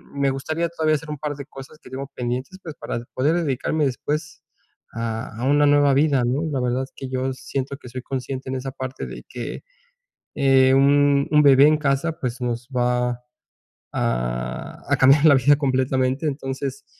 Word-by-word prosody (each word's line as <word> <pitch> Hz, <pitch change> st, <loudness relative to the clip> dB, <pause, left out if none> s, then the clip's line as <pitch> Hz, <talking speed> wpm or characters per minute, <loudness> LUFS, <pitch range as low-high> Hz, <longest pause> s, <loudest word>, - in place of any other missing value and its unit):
me 140 Hz, -1 st, +1 dB
gustaría 155 Hz, +5 st, -2 dB
todavía 160 Hz, -2 st, +1 dB
hacer 150 Hz, +1 st, -6 dB
un 150 Hz, -, -4 dB
par 145 Hz, 0 st, -4 dB
de 140 Hz, -1 st, -8 dB
cosas 135 Hz, +1 st, -12 dB
que -, -, -14 dB
tengo 135 Hz, +2 st, -6 dB
pendientes, 125 Hz, +9 st, -4 dB
pues, 160 Hz, -3 st, -7 dB
para 120 Hz, -, -5 dB
poder 145 Hz, +6 st, +2 dB
dedicarme 145 Hz, +2 st, 0 dB
después 150 Hz, +3 st, -3 dB, 0.5 s
a 115 Hz, 0 st, -4 dB
a -, -, 0 dB
una 145 Hz, 0 st, +4 dB
nueva 145 Hz, -1 st, +4 dB
vida, 140 Hz, -3 st, +3 dB
¿no? 130 Hz, +6 st, 0 dB
La 135 Hz, -3 st, -1 dB
verdad 125 Hz, +1 st, 0 dB
es 135 Hz, -, -11 dB
que 135 Hz, -1 st, -7 dB
yo 130 Hz, 0 st, -2 dB
siento 135 Hz, +1 st, -4 dB
que 125 Hz, -, -12 dB
soy 130 Hz, +2 st, -6 dB
consciente 130 Hz, 0 st, -5 dB
en 130 Hz, -, -2 dB
esa 130 Hz, +1 st, -4 dB
parte 130 Hz, 0 st, -6 dB
de -, -, -9 dB
que, -, -, -6 dB, 0.7 s
eh, 135 Hz, -1 st, +4 dB
un 140 Hz, 0 st, +4 dB
un 150 Hz, -1 st, +6 dB
bebé 140 Hz, -1 st, +7 dB
en 155 Hz, 0 st, +4 dB
casa, 150 Hz, +3 st, -1 dB
pues, 125 Hz, -3 st, -4 dB
nos 120 Hz, 0 st, -3 dB
va 125 Hz, 0 st, +1 dB
a 120 Hz, -, -6 dB, 1.7 s
a -, -, +3 dB
cambiar 140 Hz, +3 st, +5 dB
la 145 Hz, -3 st, +8 dB
vida 140 Hz, +3 st, +4 dB
completamente. 130 Hz, 0 st, 0 dB
Entonces, 135 Hz, -1 st, -4 dB
135 Hz, 185 wpm, -22 LUFS, 130-145 Hz, 1.7 s, la